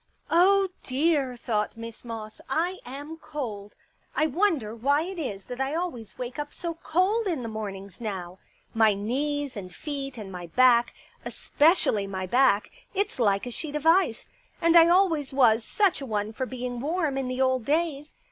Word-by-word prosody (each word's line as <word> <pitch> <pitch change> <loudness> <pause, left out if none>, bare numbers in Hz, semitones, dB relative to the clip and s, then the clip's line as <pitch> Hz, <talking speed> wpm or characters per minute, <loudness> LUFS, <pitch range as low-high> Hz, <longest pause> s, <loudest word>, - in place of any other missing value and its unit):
" - - -25
Oh, 385 +3 +5
dear," 270 -2 +1
thought 215 -2 -2
Miss 230 0 -8
Moss, 225 -2 -7
" - - -28 0.2
I 375 +1 -7
am 290 +5 -7
cold. 225 -11 -6 0.4
I 310 - +3
wonder 310 - 0
why 285 +6 +2
it 370 +1 -6
is 205 -10 -4
that 250 +1 -5
I 270 +3 -1
always 250 - -4
wake 250 +3 -5
up 295 0 -4
so 340 -1 -4
cold 370 +7 +1
in 320 -9 -1
the - - -4
mornings 200 -2 -7
now. 185 -4 -5 0.3
My 220 -2 +4
knees 275 +6 -2
and 185 -3 -7
feet 275 - -5
and 205 -3 -7
my 180 -2 -7
back 240 +4 +4
— - - -32
especially 290 - +2
my 190 -1 -4
back; 240 0 +3 0.2
it's 400 -6 -1
like 200 -3 +2
a 245 - -5
sheet 295 +4 -5
of 300 +1 -3
ice. 330 -8 +3 0.3
And 335 0 +3
I 335 0 +9
always 340 -6 +3
was 235 -4 +4
such 390 - +1
a - - -4
one 210 -1 -2
for 260 +3 -3
being 250 -1 -5
warm 310 +1 -1
in 270 -1 -2
the 255 0 -3
old 260 -2 +2
days. 300 0 -1
260 Hz, 185 wpm, -26 LUFS, 220-320 Hz, 0.4 s, I